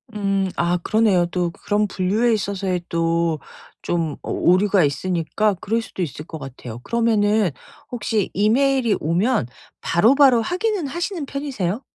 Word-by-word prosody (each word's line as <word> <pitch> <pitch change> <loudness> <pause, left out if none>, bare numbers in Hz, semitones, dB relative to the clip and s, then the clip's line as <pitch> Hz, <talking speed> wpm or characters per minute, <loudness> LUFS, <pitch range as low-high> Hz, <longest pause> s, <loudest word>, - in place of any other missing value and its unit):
음. 195 -2 0
아 170 +1 +1
그러네요. 215 -5 +3
또 175 -1 -1
그런 205 +4 -1
분류에 210 +6 +1
있어서의 195 -4 -2
또 165 -1 0 0.4
좀 165 -4 -1
오 - - +1
오류가 195 0 +3
있으니까 170 +7 0
그럴수도 220 0 -3
있을 150 -1 -6
것 160 - -7
같아요. 130 -4 -9
그러면은 220 -3 +2 0.4
혹시 220 -4 -1
이메일이 240 +3 +2
오면 175 - +1 0.3
바로바로 245 - +4
확인은 375 - -1
하시는 340 +3 -3
편이세요? 265 -7 -3
200 Hz, 310 characters per minute, -21 LUFS, 170-230 Hz, 0.4 s, 바로바로